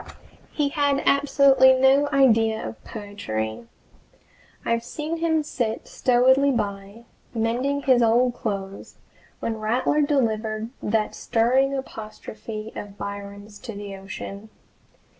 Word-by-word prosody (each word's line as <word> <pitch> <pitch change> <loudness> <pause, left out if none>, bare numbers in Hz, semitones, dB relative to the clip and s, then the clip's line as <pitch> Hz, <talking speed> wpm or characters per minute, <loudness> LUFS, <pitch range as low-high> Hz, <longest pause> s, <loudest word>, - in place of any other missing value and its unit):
He 290 -2 0
had 285 -2 +1
absolutely 275 -2 +5
no 270 +2 +4
idea 225 -5 +3
of - - -10
poetry. 205 - -5 1.0
I've 230 0 0
seen 305 +6 -4
him 320 -2 +1
sit 235 -6 -3
stolidly 260 +3 +3
by, 205 -2 -3 0.3
mending 250 +5 0
his 255 -3 +4
old 240 +2 +3
clothes, 195 -4 -5 0.5
when 225 -1 -2
Rattler 245 +7 +1
delivered 225 -6 0
that 215 0 0
stirring 260 +4 +1
apostrophe 215 -3 -7
of 205 -1 -8
Byron's 200 0 -8
to 230 - -7
the 200 -1 -7
ocean. 200 +2 -8
230 Hz, 110 wpm, -24 LUFS, 210-270 Hz, 1.0 s, absolutely